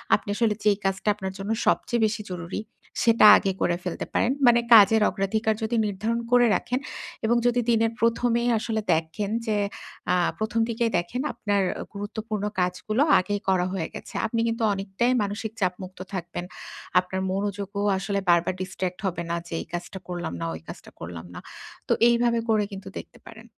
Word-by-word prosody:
আপনি 210 Hz, -, -6 dB
আসলে 225 Hz, -1 st, +2 dB
যেই 205 Hz, -1 st, +4 dB
কাজটা 195 Hz, +2 st, -1 dB
আপনার 190 Hz, -2 st, -5 dB
জন্য 195 Hz, +2 st, -4 dB, 0.2 s
সবচেয়ে 235 Hz, -1 st, +1 dB
বেশি 215 Hz, 0 st, -1 dB
জরুরি 175 Hz, +1 st, -4 dB, 0.4 s
সেটা 230 Hz, -2 st, +5 dB
আগে 195 Hz, -, 0 dB
করে 175 Hz, -, +2 dB
ফেলতে 180 Hz, -, -4 dB
পারেন। 240 Hz, -, +2 dB, 0.2 s
মানে 240 Hz, 0 st, +6 dB
কাজের 220 Hz, 0 st, +8 dB
অগ্রাধিকার 215 Hz, +2 st, 0 dB
যদি 220 Hz, +2 st, -1 dB
নির্ধারণ 215 Hz, +3 st, -1 dB
করে 245 Hz, 0 st, +6 dB
রাখেন 250 Hz, +7 st, -1 dB, 0.5 s
এবং 235 Hz, +2 st, +3 dB
যদি 245 Hz, 0 st, +2 dB
দিনের 225 Hz, -1 st, +3 dB
১ম 230 Hz, +1 st, +2 dB
এই 245 Hz, -, +2 dB
আসলে 220 Hz, 0 st, -2 dB
দেখেন 165 Hz, +6 st, -2 dB, 0.2 s
যে, 215 Hz, -1 st, +1 dB, 0.6 s
আ -, -, +4 dB, 0.2 s
১ম 220 Hz, +1 st, -1 dB
দিকেই 230 Hz, 0 st, 0 dB
দেখেন 175 Hz, +9 st, -2 dB
আপনার 205 Hz, -2 st, 0 dB, 0.3 s
গুরুত্বপূর্ণ 210 Hz, +1 st, -4 dB, 0.2 s
কাজগুলো 180 Hz, +6 st, 0 dB, 0.2 s
আগেই 205 Hz, +2 st, -2 dB
করা 185 Hz, -2 st, +2 dB
হয়ে 175 Hz, -4 st, -2 dB
গেছে। -, -, -9 dB
আপনি 230 Hz, +1 st, -1 dB
কিন্তু 230 Hz, 0 st, -1 dB
অনেকটাই 195 Hz, +5 st, 0 dB
মানসিক 205 Hz, +2 st, -4 dB
চাপমুক্ত 185 Hz, 0 st, -3 dB
থাকবেন। 175 Hz, -1 st, -4 dB, 0.5 s
আপনার 185 Hz, +1 st, -3 dB
মনোযোগও 200 Hz, +1 st, -2 dB
আসলে 200 Hz, +1 st, -1 dB
বারবার 170 Hz, +1 st, +4 dB
distract 185 Hz, -1 st, -4 dB
হবে 175 Hz, -2 st, -3 dB
না 170 Hz, -, 0 dB
যে, -, -, -8 dB
এই -, -, -8 dB
কাজটা 175 Hz, +2 st, -5 dB
করলাম 175 Hz, -, -4 dB
না, -, -, -1 dB
ওই 80 Hz, -, -9 dB
কাজটা -, -, -10 dB
করলাম 85 Hz, 0 st, -7 dB
না। -, -, -7 dB, 0.5 s
তো -, -, +5 dB, 0.2 s
এইভাবে 235 Hz, 0 st, +2 dB
করে 220 Hz, -1 st, +4 dB
কিন্তু 195 Hz, 0 st, -8 dB
দেখতে -, -, -13 dB
পারেন। 220 Hz, 0 st, -12 dB
205 Hz, 175 wpm, -25 LUFS, 185-225 Hz, 0.6 s, কাজের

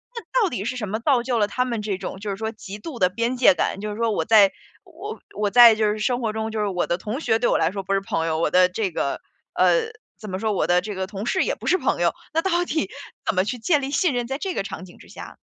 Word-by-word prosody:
那 475 Hz, +2 st, -1 dB
到 390 Hz, -, +2 dB
底 210 Hz, -5 st, -4 dB
是 240 Hz, +4 st, -3 dB
什 210 Hz, -4 st, -4 dB
么 220 Hz, +4 st, -3 dB
造 250 Hz, -2 st, +2 dB
就 245 Hz, -2 st, 0 dB
了 205 Hz, -, +2 dB
他 250 Hz, +4 st, -1 dB
们 235 Hz, -4 st, -3 dB
这 205 Hz, -3 st, -2 dB
种 190 Hz, 0 st, -7 dB
就 210 Hz, -, -4 dB
是 195 Hz, -, -3 dB
说 220 Hz, +1 st, -4 dB
极 205 Hz, -1 st, -9 dB
度 250 Hz, +2 st, -8 dB
的 180 Hz, -1 st, +4 dB
边 235 Hz, +6 st, -1 dB
界 260 Hz, +3 st, +6 dB
感， 195 Hz, -, -2 dB
就 210 Hz, -, -4 dB
是 210 Hz, -, -6 dB
说 230 Hz, -1 st, +1 dB
我 -, -, 0 dB
在 210 Hz, -3 st, +5 dB, 0.3 s
我 370 Hz, +5 st, -8 dB, 0.2 s
我 210 Hz, -1 st, +1 dB
在 235 Hz, 0 st, +8 dB
就 215 Hz, -1 st, +1 dB
是 215 Hz, -, -4 dB
生 245 Hz, +3 st, 0 dB
活 225 Hz, -2 st, -1 dB
中 220 Hz, +1 st, -3 dB
就 220 Hz, -1 st, -2 dB
是 210 Hz, -, 0 dB
我 180 Hz, -3 st, -1 dB
的 175 Hz, -, 0 dB
同 215 Hz, +7 st, -5 dB
学 225 Hz, -8 st, +1 dB
对 240 Hz, -, +1 dB
我 -, -, +3 dB
来 160 Hz, -, +1 dB
说 195 Hz, -, -4 dB
不 195 Hz, -, -2 dB
是 195 Hz, -, +3 dB
朋 165 Hz, -4 st, -2 dB
友， 160 Hz, -1 st, -1 dB
我 170 Hz, -, +1 dB
的 180 Hz, 0 st, +5 dB
这 190 Hz, +1 st, -2 dB
个， 140 Hz, -3 st, -2 dB, 0.3 s
呃， 475 Hz, -2 st, +3 dB, 0.3 s
怎 215 Hz, -, -8 dB
么 185 Hz, 0 st, -4 dB
说， 220 Hz, +1 st, 0 dB
我 -, -, 0 dB
的 175 Hz, 0 st, +3 dB
这 210 Hz, +2 st, -5 dB
个 190 Hz, 0 st, -3 dB
同 200 Hz, +1 st, -6 dB
事 375 Hz, +10 st, +1 dB
也 -, -, -1 dB
不 -, -, -12 dB
是 370 Hz, -, +4 dB
朋 -, -, 0 dB
友， -, -, +2 dB, 0.2 s
那 325 Hz, -, +2 dB
到 350 Hz, -2 st, +1 dB
底 315 Hz, -1 st, -1 dB, 0.4 s
怎 220 Hz, -, +1 dB
么 185 Hz, -, +3 dB
去 245 Hz, +5 st, -3 dB
建 290 Hz, +6 st, +1 dB
立 270 Hz, -, -3 dB
信 305 Hz, +1 st, +2 dB
任， 245 Hz, -1 st, -2 dB
在 270 Hz, +2 st, -3 dB
这 380 Hz, +3 st, -3 dB
个 -, -, -1 dB
场 190 Hz, -1 st, -7 dB
景 175 Hz, -, -16 dB
之 -, -, -16 dB
下？ -, -, -10 dB
220 Hz, 330 characters per minute, -23 LUFS, 195-250 Hz, 0.4 s, 在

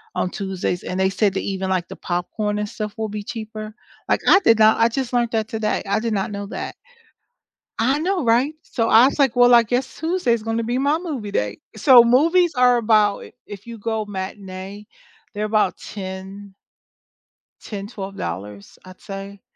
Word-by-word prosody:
on 185 Hz, -, 0 dB
Tuesdays 190 Hz, -3 st, -3 dB
and 185 Hz, -, -4 dB
they 190 Hz, 0 st, +3 dB
said 195 Hz, +1 st, +1 dB
that -, -, 0 dB
even, 190 Hz, -1 st, -3 dB
like, 185 Hz, -2 st, 0 dB
the -, -, -8 dB
popcorn 210 Hz, +4 st, -2 dB
and 210 Hz, -, -3 dB
stuff 210 Hz, -2 st, -5 dB
will 220 Hz, -1 st, -3 dB
be 210 Hz, 0 st, -5 dB
cheaper. 215 Hz, -1 st, -7 dB, 0.3 s
Like, -, -, +2 dB
I 385 Hz, -, +7 dB
did 230 Hz, -, +4 dB
not 215 Hz, +1 st, +5 dB
I 230 Hz, -, +5 dB
just 260 Hz, 0 st, -3 dB
learned 240 Hz, -1 st, +1 dB
that 220 Hz, -1 st, -1 dB
today 220 Hz, -1 st, -1 dB
I 200 Hz, -, +1 dB
did 230 Hz, 0 st, -2 dB
not 200 Hz, 0 st, -1 dB
know 200 Hz, 0 st, -5 dB
that. -, -, -6 dB, 1.1 s
I 260 Hz, +5 st, +2 dB
know, 355 Hz, 0 st, 0 dB
right? 245 Hz, +6 st, +2 dB
So, 230 Hz, -7 st, -2 dB
I 225 Hz, +3 st, +7 dB
was, 280 Hz, -, -3 dB
like, 265 Hz, -4 st, +3 dB
well, 245 Hz, 0 st, +6 dB
I 235 Hz, -, +7 dB
guess 245 Hz, +3 st, -2 dB
Tuesday's 320 Hz, -10 st, 0 dB
gonna 225 Hz, +1 st, -1 dB
be 240 Hz, +2 st, -1 dB
my 285 Hz, +3 st, +2 dB
movie 275 Hz, -, -5 dB
day. 105 Hz, -, -2 dB, 0.2 s
So, 240 Hz, +3 st, +7 dB
movies 330 Hz, +9 st, +3 dB
are 250 Hz, -1 st, +5 dB
about 215 Hz, -3 st, +3 dB
if -, -, -12 dB
if 205 Hz, +2 st, -10 dB
you 235 Hz, -, -8 dB
go 220 Hz, 0 st, -2 dB
matinee, 195 Hz, 0 st, -7 dB, 0.5 s
they're 210 Hz, 0 st, -2 dB
about 215 Hz, -3 st, +1 dB
10 195 Hz, 0 st, -8 dB, 1.1 s
$10, 200 Hz, -2 st, -6 dB
$12, 195 Hz, -3 st, -8 dB
I'd 100 Hz, -, -8 dB
say, 195 Hz, 0 st, -8 dB
215 Hz, 185 wpm, -21 LUFS, 195-240 Hz, 1.1 s, I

